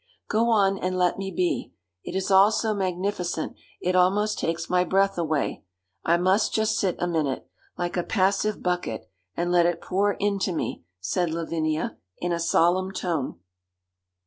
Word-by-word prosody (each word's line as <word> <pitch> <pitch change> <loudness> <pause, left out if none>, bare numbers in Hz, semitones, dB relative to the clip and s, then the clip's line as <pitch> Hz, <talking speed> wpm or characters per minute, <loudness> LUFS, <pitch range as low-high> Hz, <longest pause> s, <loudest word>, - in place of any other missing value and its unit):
'Go 230 +2 +2
on 195 -3 +3
and 185 0 -1
let 180 +1 +2
me 195 0 -3
be. 180 -1 -1 0.3
It - - -6
is 190 +1 -1
all 195 +2 +7
so 220 0 0
magnificent 185 -3 -2 0.2
it 180 +1 0
almost 200 +4 +3
takes 165 0 -2
my 180 0 +3
breath 195 +2 +2
away. 155 -8 -1 0.4
I 170 +1 +3
must 190 +4 +2
just 220 0 +1
sit 185 -3 +1
a - - -1
minute, 155 -6 -1 0.3
like 175 0 -2
a 175 - +1
passive 200 +2 +1
bucket, 180 -11 -2 0.3
and 175 +1 0
let 175 -1 +5
it 175 - -1
pour 200 +2 +1
into 200 -2 0
me,' 160 - -3 0.2
said 175 - 0
Lavinia, 160 -1 -2 0.2
in 175 - -2
a 170 - 0
solemn 175 +3 +2
tone. 170 - -2
180 Hz, 165 wpm, -25 LUFS, 170-195 Hz, 0.4 s, all